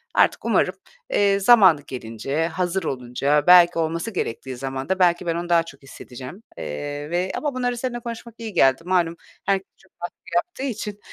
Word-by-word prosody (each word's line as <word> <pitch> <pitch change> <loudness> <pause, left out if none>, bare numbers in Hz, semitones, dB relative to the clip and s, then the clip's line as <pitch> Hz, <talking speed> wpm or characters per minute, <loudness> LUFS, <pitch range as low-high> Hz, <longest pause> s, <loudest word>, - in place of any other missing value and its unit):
Artık - - +3
umarım, - - +2 0.3
eee, 200 - +3
zamanı 195 -8 +6
gelince, 130 +6 -3
hazır 180 +2 -2
olunca, 140 +2 0
belki 175 -1 +7
olması 165 +6 -2
gerektiği 130 - -4
zamanda 135 +8 -3
belki 175 -1 +3
ben 165 -1 0
onu 175 +1 -4
daha 170 -1 +4
çok 145 -4 -13
hissedeceğim, 135 - -10
eee, 145 - -5
ve 180 +2 -1
ama 295 -2 -2
bunları 245 -1 -1
seninle 240 0 -3
konuşmak 235 -1 -8
iyi 225 -2 -7
geldi. 135 -2 +4
Malum 175 -2 +1 0.3
herkes 195 -1 0
çok 190 - -25
baskı 175 - -5 0.2
yaptığı 345 -5 -1
için 210 -5 -4
175 Hz, 165 wpm, -23 LUFS, 145-205 Hz, 0.3 s, belki